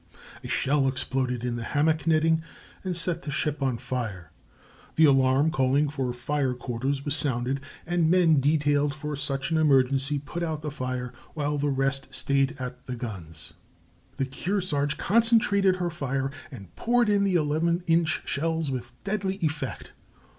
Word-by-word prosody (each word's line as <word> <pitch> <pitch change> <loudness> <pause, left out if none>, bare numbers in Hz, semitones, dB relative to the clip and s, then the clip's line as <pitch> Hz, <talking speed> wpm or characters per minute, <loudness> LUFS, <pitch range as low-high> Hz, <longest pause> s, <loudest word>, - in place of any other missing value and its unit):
A - - -6
shell 140 0 +1
exploded 130 -2 -1
in 120 -1 -2
the 120 - -4
hammock 155 +5 +1
netting 160 0 +3 0.4
and 185 -2 -2
set 170 0 -1
the 150 - -7
ship 150 +1 -1
on 130 -3 0
fire; 115 -10 -5 0.6
the 160 - +6
alarm 135 +2 +4
calling 135 +2 +2
for 135 -4 -2
fire 130 +1 -1
quarters 130 +3 -3
was 145 0 +1
sounded, 135 -2 0 0.3
and 175 -2 +1
men 170 -4 +5
detailed 145 0 +2
for 150 0 -4
such 135 +1 -3
an 160 - +2
emergency 135 -1 +3
put 145 +5 -6
out 160 -3 -3
the 150 - -3
fire, 130 -3 -4 0.2
while 145 -1 -1
the 145 +1 +1
rest 135 0 0
stayed 140 0 +1
at 125 -1 -7
the 125 - -3
guns. 90 -10 -7 0.6
The 135 - -1
Kearsarge 145 +1 -1
concentrated 210 -4 +3
her 175 -2 -2
fire 135 -4 -2 0.2
and 100 - -11
poured 240 0 +2
in 205 -1 +3
the 195 -2 +1
eleven 170 +2 +1
inch 165 -1 +2
shells 160 0 -1
with 120 -2 -5
deadly 195 -1 -1
effect. 150 -7 -3
145 Hz, 160 wpm, -26 LUFS, 130-160 Hz, 0.6 s, the